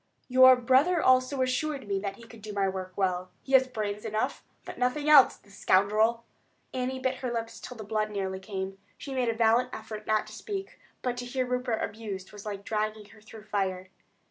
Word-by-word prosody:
"Your 260 0 +8
brother 265 +8 +3
also 255 0 +3
assured 265 0 -2
me 200 -1 0
that 195 0 -4
he 235 - -15
could 230 -1 -14
do 210 0 -7
my 200 -1 +1
work 185 -1 -4
well. 185 -2 0
He 270 - -9
had 260 -1 +5
brains 210 -3 -3
enough, 215 0 -2 0.2
but - - -8
nothing 250 +4 0
else, 295 -3 +7
the 200 - -22
scoundrel!" 215 +5 +2 0.5
Annie 260 0 -2
bit 260 0 -1
her 250 -1 -3
lips 230 -1 -4
until 250 - -9
the 220 - -7
blood 215 0 -1
nearly 190 -2 -3
came. 195 0 -5 0.2
She 275 - -7
made 255 -3 +1
a 230 - -1
valiant 230 +2 +3
effort 215 -1 -8
not 215 0 +2
to 215 - -12
speak; 390 - -6 0.2
but 245 -1 -1
to 245 - -4
hear 255 +1 -1
Rupert 250 -2 -1
abused 205 -3 -6
was 205 0 -10
like 200 -1 -5
dragging 215 -1 -2
her 220 0 -17
through 220 0 -12
fire. 190 -3 -2
220 Hz, 205 wpm, -28 LUFS, 205-255 Hz, 0.5 s, Your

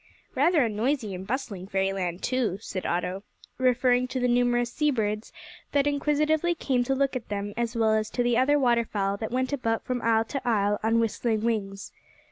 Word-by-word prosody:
"Rather 335 -7 +3
a - - +1
noisy 220 0 -1
and 185 +1 -7
bustling 210 -7 -4
fairyland 190 -2 -1
too," 245 -7 0
said 190 -3 -5
Otto, 180 +2 -2 0.4
referring 250 0 +3
to 255 - -3
the 250 - +1
numerous 245 0 +2
sea 300 -1 +1
birds 215 -4 -2 0.4
that 285 -1 +3
inquisitively 300 +3 +1
came 255 -6 0
to 270 - 0
look 275 0 0
at 250 - -5
them, 205 0 -3
as 235 0 -2
well 225 -1 +3
as 215 -1 0
to 245 - -1
the 240 -1 +2
other 265 +4 +4
waterfowl 230 -6 +1
that 220 +1 -4
went 255 +3 -1
about 230 -5 -1
from 250 -1 -2
isle 225 -1 +2
to 275 +3 -4
isle 205 -4 +1
on 225 +1 +2
whistling 225 -1 0
wings. 200 -4 -2
235 Hz, 190 wpm, -26 LUFS, 210-260 Hz, 0.4 s, other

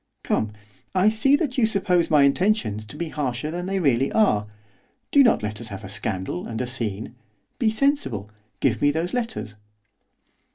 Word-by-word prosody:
'Come, 110 -1 0 0.4
I 190 +3 +5
see 220 +6 +3
that 285 -4 -1
you 225 - +4
suppose 180 -5 +1
my 150 -2 +5
intentions 140 - +1
to 105 - -11
be 170 -1 -3
harsher 145 -1 -3
than 175 +2 -4
they 195 0 -1
really 135 -6 +2
are, 105 - +3 0.6
do 285 - +6
not 235 - +3
let 105 +1 -4
us 115 - -8
have 100 -3 -8
a 95 - -8
scandal, 95 -3 -4
and 110 -1 -4
a 125 - -1
scene, 115 -4 -3 0.5
be 230 - +3
sensible! 215 - 0 0.3
give 115 -5 +1
me 145 - +5
those 165 +4 -1
letters! 230 - -3
145 Hz, 175 wpm, -24 LUFS, -, 0.6 s, do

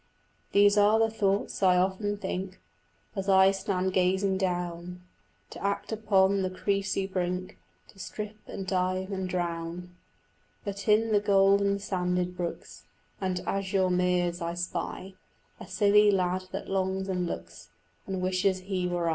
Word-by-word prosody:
These 205 +1 +5
are 210 +2 +5
the 225 0 +2
thoughts 200 -2 -1
I 185 -2 +5
often 195 +3 0
think 190 -1 -5 0.6
As 195 0 -3
I 190 0 +6
stand 190 -1 -1
gazing 190 +1 +2
down 180 -1 -3 0.5
In - - -9
act 200 +2 -2
upon 200 -3 +2
the 185 - 0
cressy 195 +1 -1
brink 185 -1 -3 0.3
To 195 - -18
strip 210 +2 -6
and 195 - -6
dive 185 +1 -1
and 190 -1 -3
drown; 175 0 -4 0.7
But 200 +1 -5
in 220 +1 +4
the 210 - +4
golden 200 0 +3
sanded 180 -2 -1
brooks 175 -1 -6 0.4
And 185 -1 -1
azure 190 -1 0
meres 180 -1 +1
I 170 0 -3
spy 180 +2 -4 0.5
A - - -9
silly 205 +2 +4
lad 185 -1 +1
that - - -5
longs 190 0 -1
and 180 -2 -1
looks - - -7 0.4
And 190 -1 -3
wishes 185 0 +1
he 185 -1 -2
were 175 -1 -1
I. - - +3
190 Hz, 145 wpm, -28 LUFS, 180-200 Hz, 0.7 s, I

